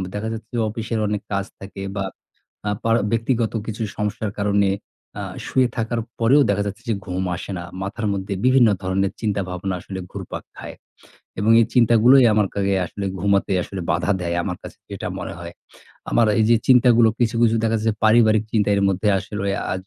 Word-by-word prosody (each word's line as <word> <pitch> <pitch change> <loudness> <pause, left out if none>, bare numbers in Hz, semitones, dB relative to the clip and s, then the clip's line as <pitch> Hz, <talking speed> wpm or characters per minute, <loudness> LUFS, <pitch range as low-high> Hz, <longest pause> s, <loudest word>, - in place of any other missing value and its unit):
দেখা 105 +2 -3
যাচ্ছে 115 0 -8
যে - - 0
অফিসের 115 +1 -3
অনেক 105 0 -2
কাজ 100 -1 -1
থাকে, 100 0 -9
বা 100 - -1 0.6
আ - - +1
পা 115 - +1 0.2
ব্যক্তিগত 115 0 0
কিছু 110 0 -4
সমস্যার 105 0 -2
কারণে 100 -1 +2 0.5
আ - - -3 0.2
শুয়ে 130 -1 +2
থাকার 115 0 -1 0.2
পরেও 125 +6 +5
দেখা 100 0 +1
যাচ্ছে 100 +2 -6
যে - - +2
ঘুম 95 0 -2
আসে 90 - -8
না। 85 - -6 0.2
মাথার 105 +3 -4
মধ্যে 100 0 -3
বিভিন্ন 130 -2 +5
ধরনের 95 +1 0
চিন্তা 105 -3 0
ভাবনা 90 +1 -3
আসলে 95 +2 -7
ঘুরপাক - - -6 0.2
খায়। - - -8 0.6
এবং 105 +2 +2
এই 115 - +3
চিন্তাগুলোই 120 +2 +6
আমার 105 -1 +3
কাছে 100 -1 +1
আসলে 100 +4 -6 0.2
ঘুমাতে 100 +1 +1
আসলে 95 +2 -6
বাধা 85 +2 0
দেয়। 85 -1 -2
আমার 90 0 -3
কাছে - - -11
যেটা - - -5
মনে - - -5
হয়। 85 0 -8 0.6
আমার 115 - +4
এই 110 - +4
যে 120 - +6
চিন্তাগুলো 120 -2 +6
কিছু, 120 -1 +1
কিছু 115 -1 +4
দেখা 115 0 +1
যাচ্ছে 110 0 -3
যে - - -4
পারিবারিক 110 -1 +5
চিন্তার 105 -2 +2
এর - - +1
মধ্যে 95 +2 0
আসলে 100 +1 -4 0.2
আ - - 0
105 Hz, 190 wpm, -22 LUFS, 100-115 Hz, 0.6 s, চিন্তাগুলোই